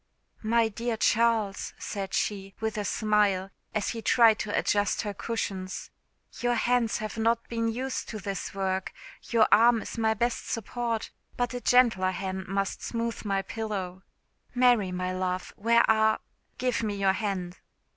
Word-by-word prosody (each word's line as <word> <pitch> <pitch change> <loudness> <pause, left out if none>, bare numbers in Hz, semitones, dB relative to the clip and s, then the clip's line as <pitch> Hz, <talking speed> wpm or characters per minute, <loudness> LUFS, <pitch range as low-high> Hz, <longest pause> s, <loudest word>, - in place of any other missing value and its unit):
"My 230 +1 +3
dear 230 +2 -3
Charles," 220 -3 +1
said 195 -1 -4
she, 195 -2 -2
with 220 0 -2
a 210 - -2
smile, 205 -2 +1 0.2
as 215 - 0
he 230 - -4
tried 225 0 +5
to 205 - -2
adjust 205 +1 +1
her 205 -2 -3
cushions, 195 -3 -4 0.5
"your 245 0 +1
hands 240 -1 +1
have 215 +1 -5
not 230 +1 +1
been 230 -1 -1
used 255 +4 -3
to 220 - -5
this 195 -1 -5
work. 190 -1 -2 0.4
Your 230 -2 +4
arm 230 -1 +6
is - - -6
my 220 -1 +2
best 235 +2 -1
support, 230 0 -3 0.3
but 245 0 -1
a 245 - -4
gentler 235 -8 +4
hand 190 0 -4
must 195 +1 -2
smooth 230 0 -3
my 195 -2 0
pillow. 195 -5 -4 0.5
Mary, 245 -6 +4
my 180 0 -2
love, 185 0 -2
where 235 +2 +3
are? 220 0 +3 0.4
Give 250 -2 0
me 210 -2 -2
your 195 -1 +2
hand." 190 -4 -3
215 Hz, 155 wpm, -28 LUFS, 195-230 Hz, 0.5 s, arm